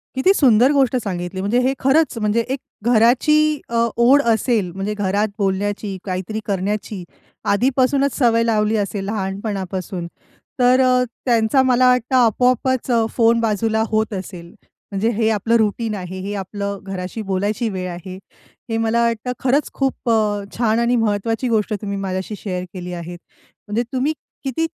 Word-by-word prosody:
किती 265 +9 +4
सुंदर 255 - +5
गोष्ट 265 -3 +2
सांगितली. 180 -1 -4
म्हणजे 210 +6 +1
हे 260 +2 +1
खरंच, 275 0 +2
म्हणजे 215 +2 +1
एक 265 0 -1 0.3
घराची 245 +6 +4 0.3
अ, 230 0 +2
ओढ 260 +4 +5
असेल. 220 -5 +1
म्हणजे 195 +3 -3
घरात 205 +1 0
बोलण्याची, 200 0 -1
काहीतरी 190 +3 -3
करण्याची 200 0 -3 0.5
आधीपासूनच 265 +5 +2
सवय 230 -3 +3
लावली 215 -1 +1
असेल 200 -1 -2
लहानपणापासून, 195 -3 -4 0.5
तर 250 +1 +5
अ, 255 0 +3 0.2
त्यांचा 235 +1 +3
मला 255 -1 +4
वाटतं, 250 +1 +1
आपोआपच 250 +2 +2 0.3
फोन 230 -1 +4
बाजूला 220 0 +1
होत 220 0 0
असेल. 185 -3 -7 0.4
म्हणजे 205 +3 0
हे 225 -1 +2
आपलं 220 +2 +1
रूटीन 220 0 0
आहे, 185 0 -6
हे 200 +2 -4
आपलं 200 +1 -4
घराशी 190 +2 -5
बोलायची 205 +4 0
वेळ 185 -2 -4
आहे. 180 +1 -8 0.5
हे 225 - -1
मला 225 +1 +1
वाटतं, 235 +1 -1
खरंच 270 +3 +1
खूप 270 -3 -2 0.5
छान 230 -1 +2
आणि 235 +1 +2
महत्त्वाची 225 +2 0
गोष्ट 215 -1 +1
तुम्ही 200 -1 -3
माझ्याशी 190 +1 -3
शेअर 180 -3 -4
केली 180 -1 -6
आहे, 175 0 -6 0.5
म्हणजे 220 +4 0
तुम्ही 265 +4 +1 0.3
किती 275 +4 -1
220 Hz, 150 wpm, -20 LUFS, 195-245 Hz, 0.5 s, सुंदर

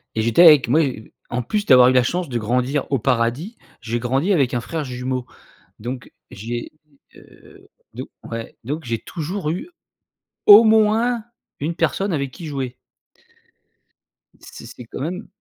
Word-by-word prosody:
et 110 - 0
j'étais 115 +10 +4
avec 150 -7 +7
moi 155 +6 +4 0.5
en 120 +1 -2
plus 210 - -2
d'avoir 125 -1 +7
eu - - +2
la 125 -1 +4
chance 175 +1 -2
de 120 - -2
grandir 125 +5 -1
au 135 - +1
paradis, 125 - -1 0.2
j'ai 115 +1 -3
grandi 135 +10 0
avec 135 -7 +1
un 120 - -1
frère 160 +6 -4
jumeau, 125 -1 -4 0.5
donc 125 +3 -7 0.2
j'ai, 120 +4 -6 0.4
heu, - - -18 0.3
donc - - -7 0.2
ouais, 115 0 -7
donc 150 +5 -4
j'ai 115 -1 -2
toujours 170 0 -5
eu 185 - -4 0.8
au 210 +2 +10
moins 220 +2 +3 0.4
1 160 +4 -2
personne 180 +4 -1
avec 140 -3 -2
qui 165 +4 -10
jouer. 130 -4 -4 1.6
C'est - - -12
c'est 125 - -11
quand - - -9
même 180 +7 -5
135 Hz, 155 wpm, -21 LUFS, 120-175 Hz, 1.6 s, au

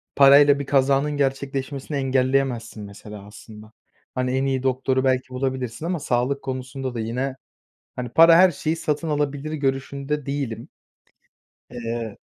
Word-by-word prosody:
parayla 140 +1 +7
bir 140 - -4
kazanın 140 +1 +2
gerçekleşmesini 135 +1 -2
engelleyemezsin 130 -4 0
mesela 100 0 -10
aslında. 110 +1 -13 0.4
Hani, 125 0 -1
en 135 - 0
iyi 130 -1 -1
doktoru 130 0 0
belki 130 -1 +1
bulabilirsin 130 0 -3
ama 175 -1 -1
sağlık 130 +2 -1
konusunda 130 0 -5
da 115 - -3
yine, 125 +4 -3 0.6
hani, 125 -2 -4
para 165 +5 +7
her 185 +2 +6
şeyi 155 0 -2
satın 160 0 -2
alabilir 145 +1 -2
görüşünde 140 0 -2
değilim. 135 -5 -4 1.0
Eee 115 -3 -5
135 Hz, 130 wpm, -23 LUFS, 125-140 Hz, 1.0 s, parayla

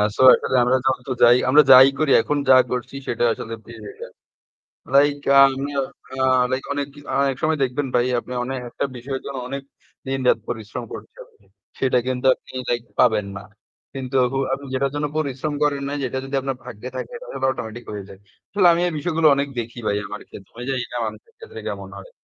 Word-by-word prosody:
so - - -1
আসলে 130 - -2
আমরা 125 +2 +3
যত 130 -1 0
যাই 120 +1 +7
আমরা 150 +3 +7
যাই 130 +1 +10
করি, 155 -3 +2
এখন 150 +4 -1
যা 130 - +9
করছি 125 +2 -4
সেটা 120 0 -1
আসলে 115 +1 -7
pre-written. 110 -3 -10 0.8
Like 145 0 +4 0.2
আমি 135 +1 -2
আ - - 0 0.4
আ - - +3 0.3
like 130 +1 -2
অনেক 145 0 -2
কি 145 - -13 0.3
একসময় 155 +4 -1
দেখবেন 135 +2 -1
ভাই, 120 0 +3
আপনি 125 - -10
অনেক 130 +1 -4
একটা - - -3
বিষয়ের 130 +2 -5
জন্য 140 - -5
অনেক 140 +1 -5 0.4
দিনরাত 130 -3 +1
পরিশ্রম 110 -3 -5
করছেন - - -10
আপনি, 445 - -29 0.3
সেটা 130 -1 +2
কিন্তু 130 0 -1
আপনি - - -18 0.2
like 120 0 -1
পাবেন 110 -4 +3
না। 100 - -11 0.5
কিন্তু 130 0 -3 0.2
হু, 135 - -1
আপনি 140 +1 -3
যেটার 135 +1 0
জন্য 145 0 -1
পরিশ্রম 145 0 -2
করেন 145 -2 +1
না, 140 - -4
যেটা 130 0 -2
যদি 135 +1 -7
আপনার 135 -1 -3
ভাগ্যে 125 -1 -8
থাকে, - - -6
তাহলে - - -9
automatic 120 -2 -6
হয়ে 100 -2 -6
যায়। 95 - -13 0.3
আসলে 200 -3 +3
আমি 170 - +1
এই - - -4
বিষয়গুলো 160 +1 +1
অনেক 140 +1 -1
দেখি 115 +1 -8
ভাই 100 - +1
আমার 105 - -7
ক্ষেত্রে। 95 - -13
আমি 120 - -6
জানিনা 125 -2 -3
মানুষের 460 - -9
ক্ষেত্রে 450 0 -10
কেমন - - -6
হয়। - - -12
130 Hz, 195 wpm, -22 LUFS, 120-145 Hz, 0.8 s, যাই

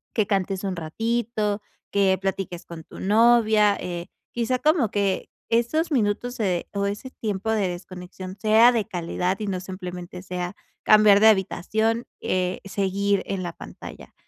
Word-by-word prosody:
que 215 -3 +2
cantes 195 -1 -1
un 190 -2 -2
ratito, 215 +4 -1 0.3
que 195 -2 +3
platiques 190 -2 -3
con 165 -1 -9
tu - - -12
novia, 215 -1 +4
eh, 175 -1 -5 0.2
quizá 240 +2 -1
como 300 -6 +3
que 200 -3 0 0.2
esos 240 +9 +1
minutos 245 -1 0
se 185 -7 -1
o 200 0 -1
ese 205 +6 -4
tiempo 215 -3 -3
de 210 -3 +1
desconexión 185 +1 -8
sea 220 +3 +6
de 230 -4 0
calidad 180 +1 -2
y 210 - -3
no 190 -2 -2
simplemente 180 -1 -7
sea 180 0 -5 0.3
cambiar 210 -1 +7
de 220 - +8
habitación, 220 +4 +1 0.2
eh, 185 0 -1
seguir 200 0 0
en 195 -1 -3
la 175 -1 -4
pantalla. - - -11
200 Hz, 150 wpm, -24 LUFS, 185-220 Hz, 0.3 s, de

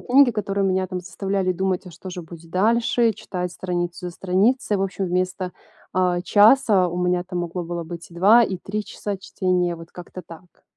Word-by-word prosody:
книги, 265 0 +5
которые 200 -2 -1
меня 185 -1 +1
там 185 0 -4
заставляли 190 0 -1
думать: 190 0 -1
"А - - -8
что 180 +3 -10
же 180 -1 -6
будет 165 0 -12
дальше?" 230 +5 +2
Э, - - -2
читать 180 -3 -5
страницу 175 -1 -3
за - - -4
страницей. 200 +6 +1
В 195 - 0
общем, 195 0 -2
вместо, 180 0 -1 0.4
а, 180 -1 +1
часа 205 -2 +5
у 175 - -5
меня 180 0 +1
там 180 -1 -4
могло 175 +1 -4
было 170 0 -4
быть 170 +1 -8
2 200 +8 +6
и 190 -3 -3
3 210 +3 -4
часа 205 -2 -5
чтения. 185 -2 -1
Вот 165 0 -12
как-то 180 +1 -10
так. 170 +2 -15
185 Hz, 195 wpm, -23 LUFS, 175-200 Hz, 0.4 s, 2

